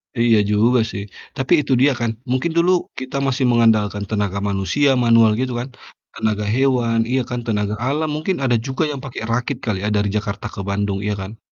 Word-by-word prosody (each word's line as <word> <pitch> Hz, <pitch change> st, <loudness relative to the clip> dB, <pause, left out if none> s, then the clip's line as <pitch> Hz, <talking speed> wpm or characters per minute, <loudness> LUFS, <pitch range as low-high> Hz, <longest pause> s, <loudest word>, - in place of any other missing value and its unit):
Iya 115 Hz, -2 st, +4 dB
juga 115 Hz, +4 st, +3 dB
sih, 100 Hz, 0 st, -5 dB, 0.3 s
tapi 135 Hz, +5 st, 0 dB
itu 140 Hz, -, -5 dB
dia 145 Hz, -, +5 dB
kan, 120 Hz, -1 st, 0 dB, 0.2 s
mungkin 130 Hz, +6 st, 0 dB
dulu 170 Hz, +2 st, +4 dB, 0.3 s
kita 130 Hz, +1 st, -5 dB
masih 135 Hz, 0 st, 0 dB
mengandalkan 110 Hz, -3 st, +2 dB
tenaga 100 Hz, -2 st, -1 dB
manusia, 100 Hz, +9 st, +1 dB
manual 115 Hz, -2 st, +5 dB
gitu 130 Hz, -1 st, -1 dB
kan, 125 Hz, -, -4 dB, 0.5 s
tenaga 105 Hz, -1 st, -1 dB
hewan 125 Hz, -3 st, +2 dB
iya 130 Hz, +1 st, +1 dB
kan, 125 Hz, -, -2 dB
tenaga 105 Hz, -2 st, 0 dB
alam 150 Hz, +4 st, 0 dB
mungkin 165 Hz, +5 st, -1 dB
ada 125 Hz, -2 st, +2 dB
juga 135 Hz, +4 st, -1 dB
yang 140 Hz, -, -5 dB
pakai 130 Hz, -, -7 dB
rakit 125 Hz, +3 st, -1 dB
kali 105 Hz, -4 st, -1 dB
ya, 105 Hz, -, 0 dB
dari 100 Hz, 0 st, +1 dB
Jakarta 100 Hz, -1 st, -3 dB
ke -, -, -8 dB
Bandung, 100 Hz, 0 st, -1 dB
iya 105 Hz, -, 0 dB
kan? 105 Hz, +4 st, -8 dB
115 Hz, 195 wpm, -20 LUFS, 105-130 Hz, 0.5 s, dia